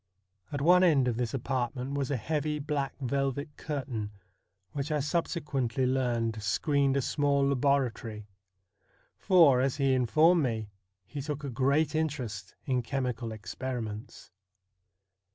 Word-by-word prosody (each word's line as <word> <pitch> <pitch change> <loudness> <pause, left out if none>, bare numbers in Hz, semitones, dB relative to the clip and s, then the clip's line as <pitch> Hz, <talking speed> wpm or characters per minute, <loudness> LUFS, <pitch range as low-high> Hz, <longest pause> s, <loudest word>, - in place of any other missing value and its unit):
At 145 - -3
one 180 +4 +6
end 145 -8 +4
of 120 -2 0
this 120 -2 -1
apartment 130 0 -2
was 140 -2 -1
a 140 - 0
heavy 150 +5 -1
black 145 -2 -2
velvet 140 +2 -2
curtain, 130 -8 -4 0.6
which 140 +1 -3
I 150 - +1
subsequently 140 -5 -1
learned 120 -4 0
screened 140 - +1
a 135 - +1
small 140 0 +2
laboratory; 125 -6 0 0.9
for, 165 -10 +5
as 135 0 +1
he 135 -2 +2
informed 155 +8 +4
me, 110 -6 -2 0.3
he 145 - -6
took 150 +1 -4
a 140 - -4
great 140 +5 +2
interest 125 -11 -3
in 130 -2 +1
chemical 125 -2 -3
experiments. 110 0 -6
135 Hz, 130 wpm, -29 LUFS, 120-145 Hz, 0.9 s, one